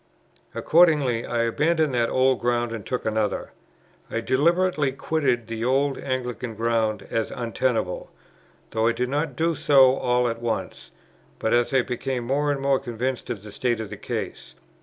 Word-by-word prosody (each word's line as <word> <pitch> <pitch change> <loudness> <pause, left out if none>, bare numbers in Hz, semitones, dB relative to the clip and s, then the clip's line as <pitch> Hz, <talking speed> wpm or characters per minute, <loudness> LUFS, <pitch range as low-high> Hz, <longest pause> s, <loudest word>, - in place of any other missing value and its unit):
Accordingly, 150 -9 +3
I 120 -1 0
abandoned 155 +5 +1
that 120 -1 +1
old 130 0 +2
ground 120 -1 0
and 115 -3 -5
took 125 +4 -3
another. 110 -1 -1 0.6
I 115 - -2
deliberately 150 +4 +2
quitted 135 -5 0
the 115 0 -5
old 135 +2 +1
Anglican 125 -3 -4
ground 115 -1 0
as 115 -1 0
untenable; 115 -5 -2 0.6
though 110 0 +1
I 115 - +3
did 125 +1 -2
not 145 0 -1
do 165 +3 +1
so 135 -4 +5
all 125 0 +1
at 115 0 -3
once, 115 -2 -3 0.5
but 110 - 0
as 120 +2 +2
I 130 -2 +3
became 125 0 -3
more 145 +4 0
and 140 - -1
more 135 -1 +2
convinced 125 0 -4
of 100 -3 -4
the 105 - -9
state 120 +1 -1
of 110 -2 -6
the - - -5
case. - - -5
125 Hz, 165 wpm, -24 LUFS, 115-135 Hz, 0.6 s, so